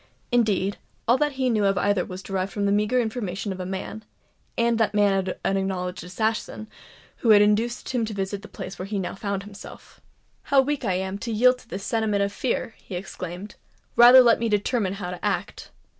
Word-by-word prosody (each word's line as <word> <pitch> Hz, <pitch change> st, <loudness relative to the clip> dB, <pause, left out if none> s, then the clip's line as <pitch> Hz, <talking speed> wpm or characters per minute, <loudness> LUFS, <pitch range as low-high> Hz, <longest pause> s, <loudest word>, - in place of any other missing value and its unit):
Indeed, 210 Hz, -5 st, +1 dB, 0.3 s
all 240 Hz, +3 st, +4 dB
that 295 Hz, -1 st, +1 dB
he 260 Hz, -1 st, 0 dB
knew 220 Hz, -4 st, +2 dB
of 195 Hz, -1 st, +2 dB
either 200 Hz, -1 st, +2 dB
was 185 Hz, +1 st, -8 dB
derived 195 Hz, 0 st, -2 dB
from 205 Hz, -1 st, -2 dB
the 200 Hz, -, +2 dB
meagre 210 Hz, +5 st, +2 dB
information 215 Hz, -4 st, -3 dB
of 190 Hz, -, -6 dB
the 180 Hz, -, -4 dB
man 190 Hz, +3 st, -5 dB, 0.5 s
(and 235 Hz, -1 st, +2 dB
that 215 Hz, -2 st, +1 dB
man 195 Hz, -2 st, +2 dB
an 195 Hz, -, +2 dB
acknowledged 185 Hz, -2 st, -3 dB
assassin!) 215 Hz, +3 st, -2 dB, 0.5 s
who 235 Hz, -, -1 dB
had 210 Hz, -1 st, +8 dB
induced 225 Hz, +4 st, 0 dB
him 245 Hz, -3 st, 0 dB
to 215 Hz, -, -5 dB
visit 195 Hz, 0 st, -3 dB
the 210 Hz, -, -11 dB
place 190 Hz, -, -8 dB
where 185 Hz, -, -5 dB
he 205 Hz, 0 st, -3 dB
now 190 Hz, -, -3 dB
found 200 Hz, -1 st, -3 dB
himself. 200 Hz, 0 st, -12 dB, 0.4 s
"How 280 Hz, -1 st, +4 dB
weak 280 Hz, +1 st, +1 dB
I 195 Hz, -5 st, +1 dB
am 190 Hz, +2 st, -3 dB
to 230 Hz, -, -4 dB
yield 250 Hz, +3 st, +4 dB
to -, -, -19 dB
this 195 Hz, +1 st, -5 dB
sentiment 215 Hz, -3 st, 0 dB
of 200 Hz, 0 st, -2 dB
fear!" 235 Hz, -2 st, -2 dB
he 190 Hz, -, -8 dB
exclaimed. 180 Hz, +1 st, -7 dB, 0.4 s
"Rather 245 Hz, +2 st, +9 dB
let 235 Hz, -2 st, +4 dB
me 230 Hz, 0 st, 0 dB
determine 210 Hz, -1 st, 0 dB
how 185 Hz, -3 st, -5 dB
to 180 Hz, -, -8 dB
act." -, -, -3 dB
205 Hz, 205 wpm, -24 LUFS, 190-230 Hz, 0.5 s, Rather